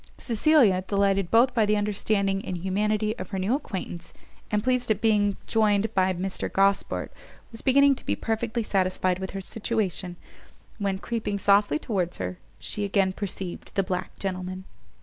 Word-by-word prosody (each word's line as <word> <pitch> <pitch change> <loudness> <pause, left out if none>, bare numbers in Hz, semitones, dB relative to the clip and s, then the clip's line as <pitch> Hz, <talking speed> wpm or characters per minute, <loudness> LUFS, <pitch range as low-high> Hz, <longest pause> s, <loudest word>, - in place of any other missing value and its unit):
Cecilia, 230 -5 +3
delighted 195 -1 +1
both 245 +3 +4
by 230 -3 +3
the 210 0 +3
understanding 200 -1 0
and 180 - -4
humanity 210 +4 0
of - - -6
her 195 - -3
new 190 +5 0
acquaintance, 185 - -5 0.4
and 210 -1 0
pleased 250 -1 +1
at 215 -2 +2
being 205 -3 +2
joined 215 -1 +2
by 185 0 +3
Mr 185 +1 -3
Gosport, 195 0 +1 0.4
was 225 - -8
beginning 280 +1 +5
to 265 - -10
be - - +1
perfectly 225 +1 -2
satisfied 185 -2 +1
with 190 0 -4
her 195 - -5
situation, 195 -4 -2 0.6
when, 200 -2 0
creeping 210 0 -3
softly 200 -4 +3
towards 180 -1 -2
her, 90 -1 -4 0.2
she 210 - -3
again 195 -2 +1
perceived 190 -2 -6
the 195 - +2
black 185 -1 -4
gentleman. 185 -1 -4
200 Hz, 160 wpm, -26 LUFS, 185-220 Hz, 0.6 s, beginning